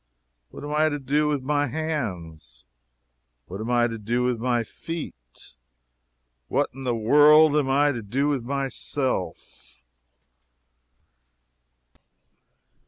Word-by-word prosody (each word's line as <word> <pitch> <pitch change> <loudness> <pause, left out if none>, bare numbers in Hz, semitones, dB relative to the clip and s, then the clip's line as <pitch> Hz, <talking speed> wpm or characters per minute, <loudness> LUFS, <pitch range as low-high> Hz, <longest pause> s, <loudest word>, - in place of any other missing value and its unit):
What - - -11
am 145 0 -5
I 155 +1 +3
to 145 - -3
do 145 +2 0
with 145 -3 -1
my 145 +1 0
hands? 90 - -5 0.8
What 95 +4 -7
am 110 - -4
I 120 -1 +3
to 115 -1 -4
do 120 +4 -1
with 125 -2 0
my 120 0 0
feet? 110 - -9 0.9
What - - 0
in 135 +1 -9
the 120 -2 0
world 150 +6 +6
am 145 -3 +1
I 145 +2 +3
to 120 -4 -5
do 130 +8 -1
with 140 -5 -1
myself? 130 - -4
130 Hz, 120 wpm, -24 LUFS, 115-145 Hz, 0.9 s, world